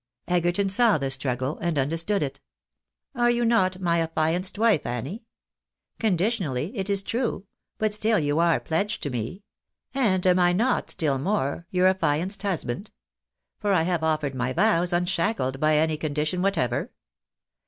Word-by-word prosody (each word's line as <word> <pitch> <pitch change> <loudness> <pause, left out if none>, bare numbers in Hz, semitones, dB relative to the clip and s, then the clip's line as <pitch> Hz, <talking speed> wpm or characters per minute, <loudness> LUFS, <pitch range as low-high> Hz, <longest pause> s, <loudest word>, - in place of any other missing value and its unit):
Egerton 175 +2 +1
saw 215 +1 +4
the 135 -2 -2
struggle, 130 +1 -1
and 170 -3 -1
understood 165 +8 0
it. 140 -1 -5 0.4
" - - -64 0.3
Are 240 -1 +3
you 240 0 +1
not 190 -6 +2
my 170 -2 +1
afltianced 165 +4 -1
wife, 215 -8 +3
Annie? 135 - -5 0.7
Conditionally, 185 - 0
it 195 -2 -3
is 200 -1 +1
true; 230 -3 -2 0.3
but 215 -1 0
still 215 +1 +2
you 150 0 0
are 170 -1 +3
pledged 200 +6 -2
to 145 - -2
me. 125 - -4 0.5
And 205 -9 +1
am 180 0 +4
I 175 0 +4
not, 240 +7 +1
still 140 -4 0
more, 170 -1 -1
your 180 0 +2
affianced 185 +1 +1
husband? 195 - -3 0.7
For 205 -2 +1
I 170 -4 +3
have 175 -1 0
offered 155 -3 0
my 130 0 -2
vows 180 -1 +2
unshackled 175 - 0
by 155 0 +3
any 155 0 +1
condition 155 +3 -2
whatever. 130 - 0
175 Hz, 155 wpm, -25 LUFS, 150-200 Hz, 0.7 s, saw